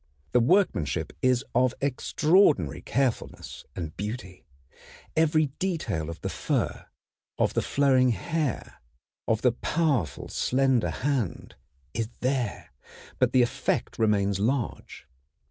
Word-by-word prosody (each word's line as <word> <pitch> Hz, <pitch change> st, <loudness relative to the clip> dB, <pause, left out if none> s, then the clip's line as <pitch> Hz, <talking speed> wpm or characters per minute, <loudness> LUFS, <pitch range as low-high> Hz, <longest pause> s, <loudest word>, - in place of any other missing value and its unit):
The -, -, +4 dB
workmanship 125 Hz, -, +1 dB
is 130 Hz, 0 st, +2 dB
of 125 Hz, +1 st, +2 dB
extraordinary 140 Hz, -, +2 dB
carefulness 130 Hz, -1 st, -2 dB
and 80 Hz, -4 st, -5 dB
beauty. 100 Hz, -3 st, -6 dB, 0.7 s
Every 155 Hz, -2 st, +3 dB
detail 115 Hz, -, -2 dB
of 85 Hz, -, -8 dB
the -, -, -3 dB
fur, -, -, -2 dB, 0.5 s
of -, -, +1 dB
the -, -, +1 dB
flowing 130 Hz, -2 st, +3 dB
hair, 155 Hz, +3 st, -2 dB, 0.5 s
of 110 Hz, 0 st, +1 dB
the 125 Hz, -, +5 dB
powerful, 135 Hz, -, -1 dB
slender 130 Hz, -2 st, +1 dB
hand, 130 Hz, -, -2 dB, 0.4 s
is 115 Hz, -1 st, -2 dB
there; 125 Hz, -4 st, -2 dB, 0.5 s
but -, -, +3 dB
the 125 Hz, -, +5 dB
effect 120 Hz, -, -2 dB
remains 100 Hz, -3 st, +2 dB
large. 120 Hz, +3 st, -2 dB
125 Hz, 110 wpm, -27 LUFS, 105-140 Hz, 0.7 s, the